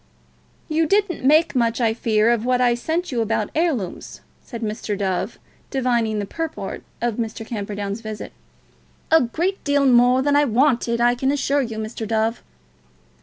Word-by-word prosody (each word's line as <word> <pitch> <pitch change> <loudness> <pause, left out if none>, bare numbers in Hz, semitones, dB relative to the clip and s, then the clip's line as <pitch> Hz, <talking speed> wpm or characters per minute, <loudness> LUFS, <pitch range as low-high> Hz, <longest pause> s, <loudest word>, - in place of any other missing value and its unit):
"You 315 0 +1
didn't 400 -4 +1
make 310 +5 +4
much, 235 -1 +1
I 225 -2 +2
fear, 220 0 +2
of 235 -2 +1
what 250 0 +1
I 245 -1 +4
sent 320 +8 -2
you 240 -3 0
about 220 -1 -1
heirlooms," 300 - -2 0.2
said 235 -2 -8
Mr. 210 -1 -3
Dove, 190 +1 -2 0.3
divining 240 -5 0
the 205 - -2
purport 325 +9 -5 0.2
of 240 -3 0
Mr. 225 -1 -4
Camperdown's 205 -1 -4
visit. 215 -1 -7 0.8
"A 320 - +7
great 340 +11 -2
deal 285 -1 +2
more 250 0 +5
than 285 0 +2
I 290 0 +4
wanted, 240 -1 +2
I 240 0 +4
can 265 +2 0
assure 285 0 +1
you, 230 -4 -4
Mr. 220 0 -5
Dove." 225 +1 0
240 Hz, 165 wpm, -22 LUFS, 220-285 Hz, 0.8 s, A